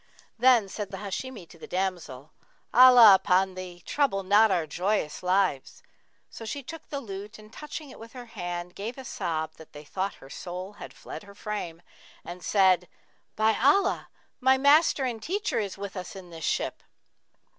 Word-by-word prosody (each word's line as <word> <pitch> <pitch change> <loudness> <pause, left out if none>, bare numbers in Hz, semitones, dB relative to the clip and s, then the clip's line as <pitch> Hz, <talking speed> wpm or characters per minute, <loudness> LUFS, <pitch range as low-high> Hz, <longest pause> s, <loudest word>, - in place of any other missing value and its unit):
Then 245 -4 +5
said 200 +1 -5
the 195 - -7
Hashimi 205 +1 -6
to 165 - -16
the - - -10
damsel, 175 -7 -4 0.4
'Allah 245 -3 +9
upon 190 0 +3
thee, 180 -1 -9
trouble 270 -10 0
not 205 +3 +5
our 175 -4 +1
joyous 175 0 -1
lives!' 185 -6 0 0.4
So - - -10
she 275 +6 -5
took 325 +5 -10
the 285 - -3
lute, 205 -4 -8
and 215 0 -16
touching 300 -1 -8
it - - -13
with 225 0 -12
her 250 -2 -9
hand, 175 -4 -6
gave 220 +7 -6
a 265 - -9
sob, 160 -7 -3
that 160 - -15
they 145 0 -10
thought 190 +6 -3
her 135 - -15
soul 180 +3 -7
had - - -8
fled - - -9
her 200 -1 -15
frame, 175 -6 -5 0.4
and 175 +1 -8
said, 185 -3 +3 0.5
'By 220 0 +3
Allah, 295 +10 +3 0.3
my 265 0 +4
master 285 0 +4
and 235 -3 -3
teacher 395 - -1
is 200 -3 -4
with 200 0 -7
us 185 +1 -7
in 185 -2 -11
this 165 -1 -6
ship!' - - -1
200 Hz, 175 wpm, -27 LUFS, 180-240 Hz, 0.5 s, Allah